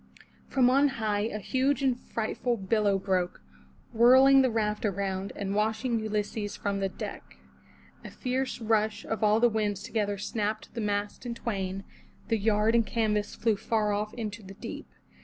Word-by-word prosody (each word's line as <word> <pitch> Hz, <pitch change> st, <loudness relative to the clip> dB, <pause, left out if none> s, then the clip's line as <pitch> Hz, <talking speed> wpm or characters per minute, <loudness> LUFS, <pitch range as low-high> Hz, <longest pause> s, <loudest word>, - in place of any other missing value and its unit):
From 260 Hz, -3 st, +3 dB
on 280 Hz, +2 st, +5 dB
high 210 Hz, -1 st, 0 dB
a 210 Hz, -, -4 dB
huge 265 Hz, +6 st, 0 dB
and 260 Hz, -2 st, +3 dB
frightful 235 Hz, 0 st, -2 dB
billow 200 Hz, 0 st, +1 dB
broke, 185 Hz, -2 st, -1 dB, 0.5 s
whirling 260 Hz, +4 st, +7 dB
the 260 Hz, -, +3 dB
raft 215 Hz, -2 st, -1 dB
around, 195 Hz, -1 st, -2 dB
and 195 Hz, -1 st, -3 dB
washing 220 Hz, +3 st, 0 dB
Ulysses 210 Hz, -1 st, -3 dB
from 200 Hz, -1 st, -2 dB
the 195 Hz, 0 st, 0 dB
deck. -, -, -8 dB, 0.7 s
A -, -, -7 dB
fierce 260 Hz, 0 st, -2 dB
rush 220 Hz, -2 st, 0 dB
of 225 Hz, 0 st, -3 dB
all 215 Hz, +1 st, +4 dB
the 240 Hz, -, +5 dB
winds 210 Hz, -3 st, -1 dB
together 205 Hz, -2 st, -1 dB
snapped 215 Hz, +1 st, -3 dB
the 235 Hz, -, -3 dB
mast 205 Hz, -1 st, -2 dB
in 240 Hz, -2 st, -4 dB
twain; 195 Hz, -4 st, -3 dB, 0.5 s
the 225 Hz, -2 st, +2 dB
yard 215 Hz, +1 st, +2 dB
and 235 Hz, -1 st, +4 dB
canvas 210 Hz, -1 st, -1 dB
flew 225 Hz, -1 st, +1 dB
far 210 Hz, 0 st, 0 dB
off 210 Hz, +1 st, -2 dB
into 220 Hz, -2 st, -5 dB
the 195 Hz, -1 st, -11 dB
deep. -, -, -7 dB
215 Hz, 165 wpm, -28 LUFS, 205-230 Hz, 0.7 s, whirling